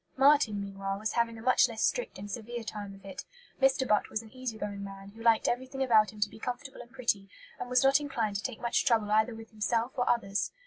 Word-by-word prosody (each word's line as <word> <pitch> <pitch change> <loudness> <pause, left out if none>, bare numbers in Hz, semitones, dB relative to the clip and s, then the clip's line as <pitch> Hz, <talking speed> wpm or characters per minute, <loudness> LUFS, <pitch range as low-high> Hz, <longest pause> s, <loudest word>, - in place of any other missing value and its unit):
Marten, 270 -6 +5
meanwhile, 195 0 -4
was 215 +2 -2
having 230 -1 0
a 225 - -10
much 255 0 +5
less 225 -1 -3
strict - - -1
and 205 +2 -7
severe 235 +2 -5
time 205 -2 -6
of 195 0 -17
it. 190 -1 -7 0.4
Mr. 265 -1 +3
Butt 210 -1 +2
was 220 - -3
an 220 - -15
easy 255 -4 -5
going 200 -1 -5
man, 195 0 -9
who 220 +3 -14
liked 230 -1 +4
everything 260 +2 -1
about 220 -4 +4
him 215 - -13
to 205 - +2
be - - -12
comfortable 260 +3 -5
and 240 - -13
pretty, 235 -6 -1 0.3
and - - -5
was 250 +1 +4
not 270 +1 +5
inclined 230 -8 -2
to - - -4
take 255 -4 -4
much 235 -1 +1
trouble 225 -5 +2
either 220 +2 +3
with 225 0 -11
himself 225 +3 0
or 245 - 0
others. 200 -4 0
225 Hz, 240 wpm, -30 LUFS, 205-250 Hz, 0.4 s, Marten